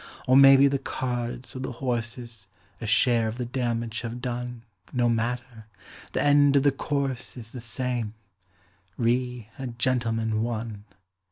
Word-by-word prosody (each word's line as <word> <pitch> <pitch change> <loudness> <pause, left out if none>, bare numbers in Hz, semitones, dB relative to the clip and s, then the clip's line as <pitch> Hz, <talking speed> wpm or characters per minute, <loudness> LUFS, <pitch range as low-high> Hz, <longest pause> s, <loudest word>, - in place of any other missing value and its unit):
Or 130 - +4
maybe 135 0 +8
the 140 0 +2
cards 125 -1 -4
or - - -4
the 130 0 -4
horses 115 -4 -4 0.3
A 115 - -4
share 115 +1 +3
of 110 +2 -4
the 125 - -2
damage 120 -2 -2
have 120 0 -5
done 120 -1 -4 0.3
No 120 -1 +2
matter; 120 0 -2 0.5
the - - +1
end 145 -1 +5
of 140 - +5
the 145 - +5
course 135 -2 -2
is 115 -2 -6
The 125 - -7
same: 120 -1 -2 0.8
"Re 125 -1 0
a 135 - -3
Gentleman, 115 -2 0
One". 110 -3 -4
120 Hz, 150 wpm, -26 LUFS, 115-130 Hz, 0.8 s, maybe